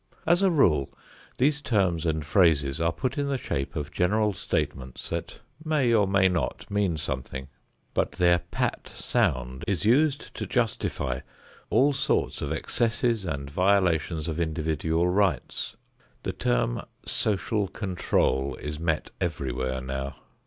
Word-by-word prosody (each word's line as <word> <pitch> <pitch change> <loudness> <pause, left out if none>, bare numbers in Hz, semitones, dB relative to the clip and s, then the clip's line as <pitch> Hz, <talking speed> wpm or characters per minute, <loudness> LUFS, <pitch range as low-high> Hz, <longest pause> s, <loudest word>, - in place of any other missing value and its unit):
As 175 +3 +4
a 195 - +5
rule, 85 - +3 0.5
these 145 +3 +2
terms 90 - +1
and 80 -2 0
phrases 75 -4 +3
are 85 0 +3
put 130 - -2
in 140 - 0
the 140 -1 0
shape 70 - -3
of 75 0 -3
general 105 +4 +2
statements 65 -7 -3
that - - -5 0.2
may 150 -7 +2
or 105 -3 +4
may 95 -1 +4
not 90 -2 -1
mean 100 -5 +1
something; 65 -2 -4 0.4
but - - 0
their 85 -1 +4
"pat" - - -3
sound 65 +1 -1
is 100 -2 0
used 145 +5 +3
to - - -4
justify 110 - -1 0.5
all 140 +2 +4
sorts 135 - 0
of 70 - -2
excesses 115 +5 0
and 70 -4 -4
violations 90 -3 +2
of 80 0 -2
individual 80 +1 0
rights. 90 -7 0 0.5
The - - -2
term - - 0 0.2
"social 105 0 0
control" 90 -9 0
is 75 +1 -6
met 80 -2 -1
everywhere 65 -6 -2
now. 65 +1 -4
85 Hz, 140 wpm, -27 LUFS, 70-105 Hz, 0.5 s, a